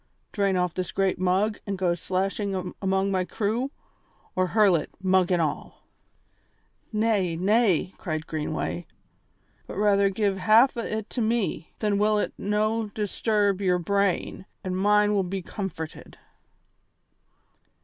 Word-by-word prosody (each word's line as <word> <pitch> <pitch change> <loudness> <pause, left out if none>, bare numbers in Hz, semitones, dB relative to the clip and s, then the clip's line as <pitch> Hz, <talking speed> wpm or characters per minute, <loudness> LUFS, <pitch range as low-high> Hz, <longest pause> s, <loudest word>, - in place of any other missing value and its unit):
Drain 195 -2 +1
off 180 -1 0
this 185 -1 -3
great 195 -2 0
mug 190 +4 +1
and 200 -1 -2
go 180 -2 +1
slashing 190 +1 -2
among 195 0 +1
my 185 -1 +1
crew, 220 +7 -1 0.7
or 185 0 +2
hurl 205 -2 +4
it, 160 - -2
mug 185 -1 +2
and 175 - +3
all 155 -3 -3 0.5
" - - -42
"Nay, 195 -7 +1
nay," 190 0 +2
cried 155 -1 -3
Greenway, 155 +2 -3 0.8
"but - - -7
rather 200 -1 +3
give 195 0 0
half 220 +8 +5
o' - - -4
it 220 -1 -4
to 245 - -2
me; 220 -7 -1
then 205 -2 0
will 210 +1 +3
it 210 - -1
no' 215 +2 0
disturb 205 -1 0
your 180 -2 +2
brain, 195 +1 -1 0.2
an' 185 - -3
mine 210 +2 +3
will 200 - +3
be 190 0 -4
comforted." 170 -5 -6
195 Hz, 140 wpm, -26 LUFS, 185-210 Hz, 0.8 s, half